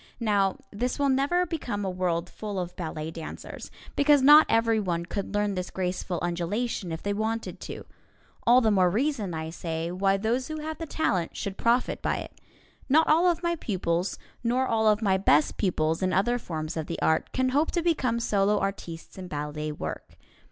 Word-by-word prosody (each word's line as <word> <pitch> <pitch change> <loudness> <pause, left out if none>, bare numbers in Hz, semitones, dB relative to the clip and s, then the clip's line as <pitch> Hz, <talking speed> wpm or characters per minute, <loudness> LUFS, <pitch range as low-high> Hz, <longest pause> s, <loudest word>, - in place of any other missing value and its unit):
Now, 200 -4 +2
this 245 +5 -2
will 285 -1 +2
never 280 +7 +2
become 245 - -3
a - - 0
world 180 -2 -1
full 210 -2 -6
of 175 -1 -5
ballet 160 -2 -4
dancers, 165 -1 -8 0.3
because 285 -1 +4
not 295 +3 +9
everyone 215 -7 +1
could 200 +2 -4
learn 205 -1 +1
this 180 -1 -3
graceful 180 -1 -2
undulation 175 +3 -2
if 160 - -5
they 205 - 0
wanted 220 +2 -3
to. - - -7 0.6
(All 245 +2 +5
the 220 -3 +3
more 185 -3 +4
reason, 220 - -1
I 160 0 -4
say, 165 0 -4
why 195 +2 +2
those 235 +5 -1
who 310 - -5
have 315 +1 -5
the 325 - -5
talent 195 - -1
should 195 -1 -4
profit 235 +4 +1
by - - 0
it.) - - -9 0.5
Not 315 +4 +5
all 330 +4 +5
of 350 0 +1
my 340 0 +1
pupils, 185 - -1 0.3
nor 250 +2 +2
all 220 -3 +2
of 210 +1 +3
my 190 -2 +3
best 150 -6 +3
pupils 160 -4 0
in 185 -1 +1
other 240 +6 +2
forms 155 -6 -5
of 160 -2 -3
the 170 - -4
art, 160 0 +1
can 260 0 +1
hope 290 +5 +2
to 345 - -1
become 260 -9 +1
solo 205 -2 +2
artistes 190 -3 -5
in 185 - -7
ballet 150 0 -4
work. 150 - -7
205 Hz, 190 wpm, -27 LUFS, 175-250 Hz, 0.6 s, not